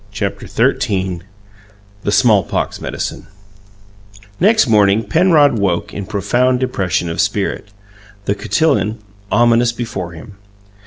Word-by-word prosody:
CHAPTER - - -4
XIII 95 -3 0 0.8
THE 100 - -2
SMALLPOX 105 -1 +1
MEDICINE - - -5 1.1
Next 220 +5 +4
morning 105 -1 +3
Penrod 145 - +3
woke 95 -4 -1
in 100 -2 -6
profound 120 +5 +1
depression 95 -9 -1
of 85 - -1
spirit, - - -2 0.6
the 100 - +1
cotillon 115 -2 0 0.3
ominous 120 0 +3
before 110 -7 -5
him. 95 +5 -12
105 Hz, 105 wpm, -17 LUFS, 95-125 Hz, 1.1 s, Next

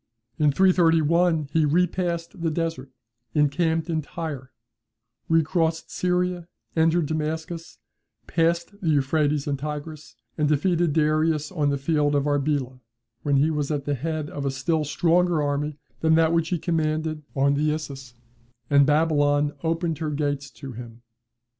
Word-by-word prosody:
"In 150 -1 +4
331, 165 -2 +3
he 160 - +3
repassed 170 +1 0
the 165 - +1
Desert, 160 -4 -3 0.5
encamped 160 +3 +1
in 160 -2 -1
Tyre, 145 -4 -6 0.8
recrossed 165 0 +1
Syria, 180 -1 -1 0.3
entered 165 0 +3
Damascus, 160 +2 -4 0.5
passed 170 +4 0
the 170 - 0
Euphrates 145 0 +1
and 140 -2 -2
Tigris, 150 -2 -6 0.2
and 150 - +3
defeated 165 +1 +2
Darius 155 0 +1
on 150 -6 0
the 140 - 0
field 145 0 +1
of 140 0 +1
Arbela, 140 -3 -1 0.4
when 145 -2 +1
he 150 +4 +3
was 150 -2 -2
at 145 -3 -2
the 145 - 0
head 155 +2 -3
of 145 - -5
a 140 - 0
still 150 +4 0
stronger 170 +3 +2
army 145 0 -1 0.2
than 160 0 +3
that 165 0 +3
which 165 -1 +1
he 180 - 0
commanded 155 -1 -1
on 140 +1 +3
the 150 +2 +1
Issus, 140 -5 -5 0.6
and 140 -1 +6
Babylon 145 -1 +2
opened 165 -1 -1
her 155 -2 -2
gates 145 -2 -2
to 135 +2 -9
him. 120 0 -10
155 Hz, 145 wpm, -24 LUFS, 145-165 Hz, 0.8 s, and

